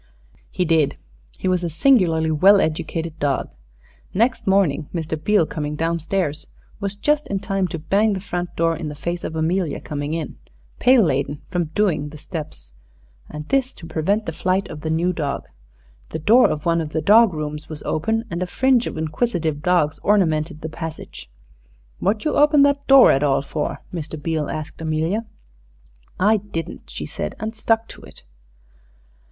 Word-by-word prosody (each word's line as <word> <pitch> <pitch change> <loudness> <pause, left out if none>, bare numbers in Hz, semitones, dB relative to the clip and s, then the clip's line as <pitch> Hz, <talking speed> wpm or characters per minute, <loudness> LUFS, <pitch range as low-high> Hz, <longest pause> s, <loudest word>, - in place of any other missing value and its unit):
He 180 - -1
did. 160 -4 +2 0.4
He - - -3
was 180 -1 +1
a 170 - -1
singularly 165 - +3
well 195 +6 +6
educated 160 0 -2
dog. 140 -2 -1 0.6
Next 230 +3 +1
morning 175 -7 +2
Mr. 160 -2 -3
Beale, 210 -5 +3
coming 150 -1 -4
down 165 +2 -1
stairs, 160 -2 -2 0.3
was 200 0 -3
just 295 +8 +1
in 200 - -1
time 195 -1 -1
to 175 - -5
bang 200 +7 +2
the 190 - -2
front 175 -2 -4
door 165 0 +1
in 155 -1 -5
the 150 - -7
face 170 +4 -4
of 160 - -4
Amelia 160 0 0
coming 145 +1 -4
in, 165 - -5 0.4
pail 250 -2 +6
laden, 145 -2 -1
from 180 -2 0
"doing" 165 -8 +1
the 150 - -11
steps, 150 - -8 0.6
and 150 0 -7
this 270 -1 +1
to 165 - -11
prevent 195 +7 0
the - - -3
flight 185 +4 0
of 150 - -8
the 160 - -3
new 170 +3 +1
dog. 145 -4 -3 0.6
The - - -4
door 220 +11 +5
of 150 - -3
one 170 -1 +2
of 155 -1 -6
the 160 - 0
dog 220 +3 +6
rooms 150 -1 -5
was 155 -2 -8
open, 225 +9 -1
and 170 +1 -3
a 185 - -1
fringe 255 +4 +2
of - - -5
inquisitive 160 -2 -1
dogs 160 -3 +1
ornamented 160 -6 +1
the 160 - -4
passage. 160 - -8 0.7
"What 210 +6 0
you 305 - +1
open 295 -1 +5
that 280 0 +1
door 270 -1 +8
at 135 - +2
all 140 -2 +2
for?" 150 +1 -3
Mr. 155 -2 -5
Beale 155 0 -2
asked 155 +1 -6
Amelia. 160 +8 -1 0.9
"I 210 +4 +4
didn't," 190 -5 -7
she - - -6
said, - - -5
and 220 +1 -4
stuck 225 0 0
to - - -11
it. - - -14
165 Hz, 180 wpm, -21 LUFS, 155-200 Hz, 0.9 s, door